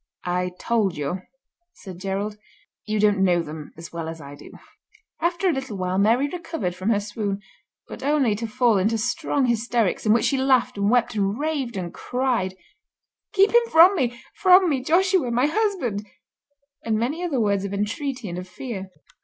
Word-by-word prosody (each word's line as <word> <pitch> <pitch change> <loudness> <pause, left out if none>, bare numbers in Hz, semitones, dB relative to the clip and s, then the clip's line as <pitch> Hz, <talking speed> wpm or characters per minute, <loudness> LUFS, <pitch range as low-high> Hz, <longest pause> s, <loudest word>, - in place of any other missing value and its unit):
"I 180 +1 0
told 215 -8 0
you," 150 +6 -3 0.5
said 185 - -11
Gerald. 200 +2 -3 0.5
"You 215 0 0
don't 205 -2 +3
know 175 -2 +3
them 150 -1 -8
as 165 0 -10
well 165 -1 -4
as 165 0 -7
I 140 -1 -10
do." 145 - -12 0.7
After 345 +3 +1
a 350 - +3
little 265 -6 -4
while 185 0 -1
Mary 230 +7 +3
recovered 325 - -4
from 185 +4 -3
her 215 -3 +3
swoon, 205 -1 -3 0.5
but - - -9
only 280 -5 +2
to 230 +1 -3
fall 235 -2 +2
into 220 +4 +1
strong 245 +4 0
hysterics, 235 -3 0
in 215 - +3
which 225 +1 +3
she 275 - +2
laughed 255 -2 +2
and 200 0 +1
wept 245 0 +2
and 200 0 0
raved 285 -7 -2
and 175 -2 -4
cried, 245 -7 -1 0.8
"Keep 395 +1 +4
him 475 0 +4
from 345 +5 +7
me—from 350 +8 +3
me, 280 -5 0
Joshua, 360 -1 +2
my 245 +3 +2
husband," 305 - -1 0.8
and 220 -1 0
many 275 +10 -2
other 305 -8 -1
words 200 -3 +1
of 200 - -4
entreaty 225 +5 -3
and 175 0 -4
of 180 - -8
fear. 190 0 -7
225 Hz, 180 wpm, -23 LUFS, 195-275 Hz, 0.8 s, from